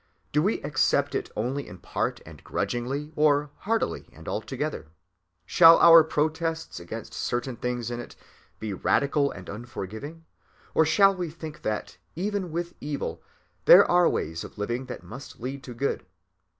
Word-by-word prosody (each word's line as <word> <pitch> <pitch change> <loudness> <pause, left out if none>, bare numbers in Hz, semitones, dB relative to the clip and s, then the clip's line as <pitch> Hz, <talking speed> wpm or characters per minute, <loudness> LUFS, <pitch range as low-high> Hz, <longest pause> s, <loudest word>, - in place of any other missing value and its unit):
Do 150 - +3
we 205 +7 +1
accept 145 -3 +1
it - - -2
only 130 +6 -2
in 90 - -10
part - - -3
and - - -13
grudgingly, 135 +6 -3
or 150 -1 +3
heartily 225 +3 -2
and - - -14
altogether? - - -3 0.6
Shall 165 - +8
our 165 -1 +9
protests 160 +1 -2
against 110 +7 -8
certain 120 +1 -2
things 120 0 -3
in 120 - -4
it 120 - -9 0.4
be 110 -2 -4
radical 140 +8 +2
and 90 -7 -9
unforgiving, 120 - -7 0.5
or 160 - +4
shall 195 +3 +5
we 180 -3 -3
think 155 -1 -9
that, 105 -4 -3 0.2
even 195 -1 -2
with 170 +1 -3
evil, 145 -1 -4 0.4
there - - +9
are 175 -1 +4
ways 80 +1 -3
of - - -11
living 120 +5 -3
that 120 - -7
must 120 +10 -10
lead 130 +3 -5
to 125 - -8
good? 140 +4 -1
140 Hz, 155 wpm, -26 LUFS, 120-165 Hz, 0.6 s, our